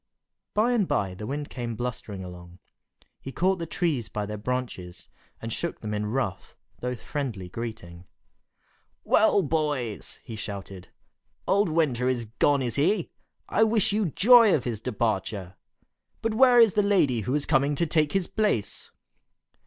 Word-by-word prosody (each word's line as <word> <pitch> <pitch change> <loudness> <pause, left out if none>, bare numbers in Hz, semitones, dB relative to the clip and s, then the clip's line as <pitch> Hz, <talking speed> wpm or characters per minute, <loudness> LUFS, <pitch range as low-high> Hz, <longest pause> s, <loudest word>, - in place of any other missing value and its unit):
By 220 +4 +3
and 220 -6 +2
by 95 -2 0
the 105 +3 -7
Wind 145 +2 -4
came 120 -2 -4
blustering 110 -4 -5
along. 90 -1 -11 0.6
He 135 - -7
caught 185 +5 +1
the 165 - -4
trees 150 - -1
by 105 0 -3
their 105 +1 -5
branches, 115 -7 -5 0.3
and 115 0 -5
shook 170 - -3
them 105 -1 -4
in 105 0 -2
rough, 115 -3 -3 0.2
though 125 0 -3
friendly 120 -7 -5
greeting. 90 -6 -7 1.0
"Well, 210 -2 +4
boys!" 145 -8 -2
he 115 - -8
shouted, 100 -3 -7 0.6
"Old 200 -1 +3
Winter 145 -7 +1
is 125 -2 0
gone, 135 +5 +1
is 120 +1 -2
he? 170 +5 +1 0.4
I 220 - +3
wish 220 -3 +2
you 210 -2 +1
joy 225 - +6
of 130 - -1
his 115 -4 -4
departure! 105 -5 -2 0.7
But 225 -1 0
where 250 +1 +6
is 225 -5 +6
the 210 - +3
lady 185 - +2
who 110 +5 -2
was 145 -1 +1
coming 140 +2 +2
to 170 - +1
take 155 -2 +1
his 195 -2 +1
place?" 205 - -1
130 Hz, 160 wpm, -26 LUFS, 105-175 Hz, 1.0 s, joy